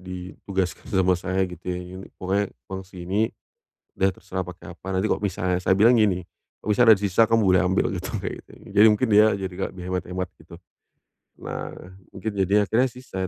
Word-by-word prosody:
ditugaskan 90 0 -4
sama 95 -1 +3
saya, 95 +1 0
gitu 90 -3 -8
ya, 90 0 -3 0.2
yunik 95 +1 -9
"Pokoknya 100 +2 0 0.2
uang 95 -1 -6
sini, 95 +4 -1 0.6
udah 95 - +2
terserah 95 0 -5
pakai 90 -1 -8
apa, 90 - -18
nanti 95 +1 0
kalau 110 - +1
misalnya" 90 -2 -1
saya 95 +1 +2
bilang 115 +4 +5
gini, 90 -4 +2 0.4
"Kalau - - -6
misal 120 +3 +4
ada 110 - +9
di 100 - -5
sisa 100 +3 +3
kamu 115 -1 +3
boleh 95 -1 +5
ambil," 95 +5 +2
gitu, 95 0 -4 0.2
kayak - - -2
gitu - - -34
kan. - - -18
Jadi 105 +2 +7
mungkin 110 +4 +2
dia 105 +1 +7
jadi 95 -1 -5
nggak 95 +2 -3
lebih 90 - -8
hemat-hemat 90 0 -3
gitu. 80 +2 -14 0.8
Nah, - - -6 0.4
mungkin 105 +3 -3
jadinya 100 +1 +2
akhirnya 120 +6 +2
sisa, 115 -7 -6
95 Hz, 200 wpm, -24 LUFS, 90-105 Hz, 0.8 s, ada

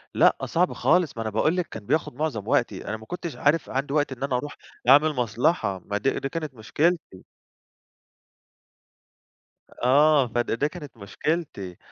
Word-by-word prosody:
لأ، - - +5
صعب 180 +2 +1
خالص، 175 -8 +2
ما - - -2
أنا 110 - -2
باقول 155 - +1
لِك 180 - -1
كان 110 -2 -9
بياخد 150 -1 0
مُعظم 140 -9 -3
وقتي، - - 0
أنا 110 - -3
ما 110 - -13
كنتش 170 +3 -6
عارف 155 +4 +1
عندي 135 +1 -2
وقت 145 -2 +1
إن 130 0 -6
أنا 140 -2 0
أرُوح 145 +3 -6 0.3
أعمل 150 +3 +6
مصلحة، 120 - 0
ما 105 - -2
دي 135 +6 0
دي 135 - -3
كانت 155 -1 -4
مشكلتي. 145 - -1 2.6
آه، 140 +1 +5
فد 120 +1 -1
ده 145 - +2
كانت 150 -5 -10
مشكلتي 100 - -4
140 Hz, 160 wpm, -25 LUFS, 115-155 Hz, 2.6 s, أعمل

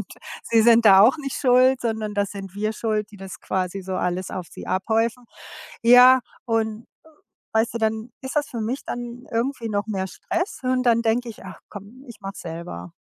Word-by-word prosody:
und - - -5 0.4
sie 225 -1 +3
sind 230 0 +5
da 195 -2 +8
auch 235 +9 +6
nicht 275 -3 -5
schuld, 255 0 +4
sondern 220 -2 -2
das 205 -1 -1
sind 195 -2 -8
wir 215 +1 -1
schuld, 215 -1 -2
die - - -11
das 195 -1 -9
quasi 190 +1 -3
so 190 0 -5
alles 180 0 -2
auf 180 -2 -6
sie - - -10
abhäufen. 225 +5 0 0.6
Ja, 250 +2 +8 0.2
und 225 -1 -1 0.7
weißt 225 +1 +1
du, - - +1
dann 220 +1 -1
ist 265 +2 -6
das 295 -1 0
für 235 -4 -5
mich 245 +6 -3
dann 240 +1 -6
irgendwie 235 0 -2
noch 205 -1 -1
mehr 190 -3 -2
Stress 355 - -4
und 255 0 +1
dann 235 -1 +3
denke 235 +2 0
ich: 210 -3 -11
„Ach 185 - -10
komm, 210 +6 -11
ich 235 - -12
mache 195 0 -6
es - - -9
selber.“ 165 - -8
225 Hz, 200 wpm, -23 LUFS, 200-245 Hz, 0.7 s, da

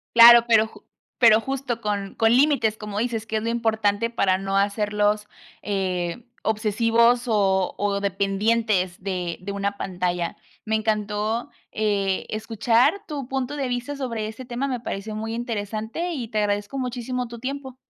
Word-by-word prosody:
Claro, 235 0 +10
pero 220 -1 +5
ju - - -17 0.4
pero 225 -3 +7
justo 265 -3 -3
con, 200 -2 -3
con 225 +1 +4
límites, 260 -6 +3
como 210 -1 -5
dices 225 -2 -2
que 220 0 -2
es 215 - -3
lo - - -2
importante 220 -1 +1
para 190 -5 +2
no 195 0 -1
hacerlos, 210 +1 +1 0.4
eh, 185 0 -2 0.2
obsesivos, 230 +3 +2
o, 195 -4 +2
o 200 -1 0
dependientes 200 -1 0
de, 180 -3 -3
de 200 +2 -6
una 200 0 -2
pantalla. 180 -3 -2 0.3
Me 220 0 0
encantó, 215 +1 -1 0.2
eh, 200 -3 0
escuchar 230 - +2
tu 285 -5 -5
punto 270 +1 -2
de 270 -3 -2
vista 245 +4 -3
sobre 230 -6 -3
ese 225 +4 -8
tema, 245 +3 -3
me 250 -3 -3
pareció 215 -1 -5
muy 225 +1 -4
interesante 230 - -3
y 255 -8 -4
te 215 -1 -2
agradezco 205 +4 -1
muchísimo 250 -1 -3
tu 235 - -9
tiempo. 265 +1 -5
220 Hz, 160 wpm, -24 LUFS, 205-240 Hz, 0.4 s, Claro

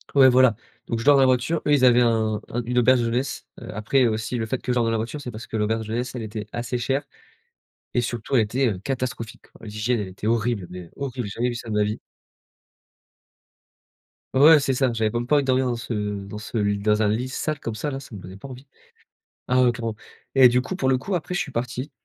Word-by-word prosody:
ouais, 135 -2 +8
voilà, 125 -3 +5 0.3
donc 115 - -2
je - - -5
dors 145 0 +7
dans - - +5
la - - +6
voiture, 130 +6 +1
eux, 150 - +4
ils 140 -3 +3
avaient 125 0 +6
un 110 -3 +1
un 120 0 -2
une 125 +1 -3
auberge 125 +1 +5
de - - 0
jeunesse, 120 +4 -2 0.2
heu. - - -9
Après 120 +5 +2
aussi 110 +2 -2
le 110 - -2
fait 130 - -2
que 125 - -2
je - - 0
dorme 120 -2 +2
dans - - +1
la 115 - +1
voiture, 115 +7 -4
c'est 125 - -6
parce 110 +1 -9
que 110 - -4
l'auberge 110 +1 0
de 110 - -7
jeunesse, 125 +2 -3
elle 120 - -4
était 105 -1 -6
assez 120 +1 -2
chère 135 +4 -1 0.9
et 120 - +3
surtout 120 +3 -3
elle 120 - +6
était, 125 +5 0
heu, 100 - -3
catastrophique. 120 -1 -4 0.2
L'hygiène 110 +2 -1
elle 100 - -3
était 95 +3 -6
horrible, 115 -4 0
mais 90 -2 -9
horrible, 130 -4 -4
j'ai 100 - -7
jamais 125 +1 +2
vu 120 - -4
ça 120 -1 -7
de - - -2
ma 105 - +3
vie 105 +1 -2 2.3
ouais, 150 +4 +7
c'est 135 -1 0
ça, 130 -1 +1
j'avais 110 -2 0
même 120 +2 -2
pas 150 - +2
envie 145 - +2
de - - -7
dormir 130 0 +2
dans 120 - 0
ce 115 +1 -5 0.3
dans 105 - -7
ce 105 +2 -5
l 100 -1 0
dans 105 0 +2
un 105 - +3
lit 115 +5 -1
sale 155 +3 -3
comme 115 - -4
ça 110 +7 -3
là, 135 - -4
ça 130 - -13
me 100 - -7
donnait 90 +1 -10
pas 100 +8 -10
envie. 130 +2 -11 0.8
Ah 125 +1 +4
heu, 120 - +4
clairement. 115 -3 -4 0.4
Et 130 -2 +8
du 125 +1 +2
coup, 185 +8 -5
pour 135 -7 0
le 130 - +3
coup, 190 +9 -4
après, 180 +1 -3
je - - 0
suis 145 - -3
parti, 125 +4 -3
120 Hz, 260 wpm, -24 LUFS, 110-130 Hz, 2.3 s, ouais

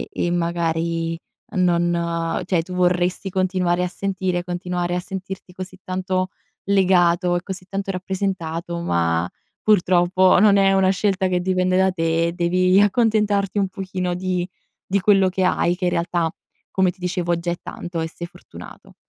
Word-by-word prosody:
ehm, - - -3
e 175 - -1
magari, 165 -1 -1 0.4
non 170 -1 +1
cioè, 175 -4 +1
tu 180 +2 -8
vorresti 180 +1 +1
continuare 180 -1 +1
a - - -1
sentire, 185 -1 -2
continuare 175 0 -2
a - - -1
sentirti 190 0 -7
così 185 +1 -8
tanto 185 0 -2 0.3
legato 180 -2 +3
e 175 - -2
così 190 -1 -7
tanto 195 0 -3
rappresentato, 185 -3 -3
ma, 85 - 0 0.3
purtroppo, 185 -2 +4
non 205 -1 +6
è 195 -1 +4
una 190 -1 +3
scelta 190 0 +1
che 180 -1 0
dipende 185 0 +1
da 190 0 +4
te, 165 -1 +1
e 170 - -3
devi 185 +2 +3
accontentarti 205 -1 +2
un 195 - +1
pochino 185 -2 -3
di 180 0 -2 0.4
di 200 +1 +1
quello 195 0 +4
che 185 0 -1
hai, 175 -1 +2
che 180 - -4
in 180 - +2
realtà, 170 -1 0 0.4
come 190 -1 +2
ti 180 - -16
dicevo, 175 -1 -1
già 170 +1 -3
è - - -3
tanto 175 -1 -5
e 160 - -2
sei 170 +1 -7
fortunato. 170 - -13
180 Hz, 165 wpm, -22 LUFS, 175-190 Hz, 0.4 s, non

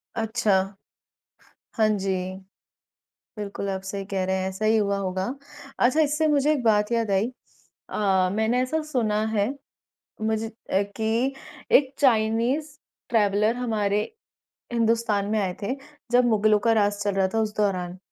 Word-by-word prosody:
अच्छा, 220 -1 0 1.3
हाँ 220 -1 +4
जी, 195 -2 0 1.3
बिल्कुल 200 -1 -4
आप 190 0 -3
सही 195 0 -5
कह 195 -2 -1
रहे 190 0 0
हैं 190 0 -1
ऐसा 190 +3 -5
ही 220 +1 +4
हुआ 200 -2 +1
होगा। 190 0 -2 0.5
अच्छा 255 +6 +3
इससे 305 +1 +2
मुझे 295 +1 +3
एक 275 -5 -1
बात 210 0 +3
याद 230 -3 0
आई। 195 +3 +2 0.6
अ, 190 -3 +2
मैंने 220 +4 +1
ऐसा 310 +5 -1
सुना 215 -4 +1
हैं 210 +7 +1 0.7
मुझे 220 0 0
अ, 220 -3 -2
कि 230 +4 0 0.4
एक 275 -1 +5
चाइनीज़ 250 +5 +2 0.3
ट्रैवलर 210 0 +2
हमारे 210 -4 0 0.7
हिंदुस्तान 230 -3 +1
में 220 - +2
आए 190 -3 -1
थे, 240 +6 -2 0.4
जब 245 0 +5
मुगलों 215 -2 +3
का 230 - +5
राज़ 205 -1 +1
चल 205 -1 0
रहा 190 -1 +3
था 225 - +1
उस 215 -1 -2
दौरान। 185 -3 -1
215 Hz, 150 wpm, -25 LUFS, 200-235 Hz, 1.3 s, एक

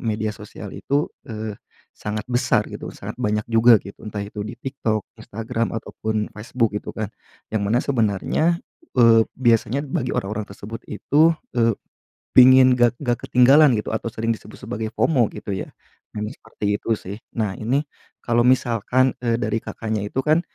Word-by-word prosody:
media 110 -2 -1
sosial 105 -1 -10
itu, 145 +2 -1 0.2
eee, 110 -1 -5 0.4
sangat 105 0 -4
besar 120 -3 +2
gitu, - - -7
sangat - - -7
banyak 105 0 0
juga 115 +1 +7
gitu, 100 - -12
entah 105 -1 -4
itu 105 +1 -7
di - - -6
Tiktok, 115 -6 -2 0.2
Instagram, 115 +1 -3
ataupun 110 -1 -3
Facebook, 110 0 -1
gitu - - -5
kan. 110 -2 -4 0.4
Yang 110 -2 0
mana 115 +4 +2
sebenarnya, 115 0 0 0.5
eee, 115 -2 +7
biasanya 120 +1 +2
bagi 135 -3 -2
orang-orang 105 +2 -2
tersebut 100 +3 -8
itu, 155 +9 +3 0.2
eee, 115 -3 +2 0.6
pingin 130 0 +8
nggak 120 0 +2
nggak 120 -4 0
ketinggalan 135 +3 +6
gitu, - - -8
atau 110 +1 -2
sering 115 +1 -3
disebut 110 - -9
sebagai 110 +1 -4
FOMO, 130 -8 +3
gitu 100 - -6
ya, - - -5 0.4
memang 105 +1 -4
seperti 110 -2 -7
itu 115 - -1
sih. 100 +1 -8 0.2
Nah, 105 -4 0
ini 125 +6 0 0.4
kalau 120 0 +2
misalkan, 125 0 +3
eee, 115 -1 +2
dari 110 0 0
Kakaknya 110 -2 -4
itu 130 - -1
kan, 155 +2 +4
115 Hz, 160 wpm, -22 LUFS, 105-125 Hz, 0.6 s, pingin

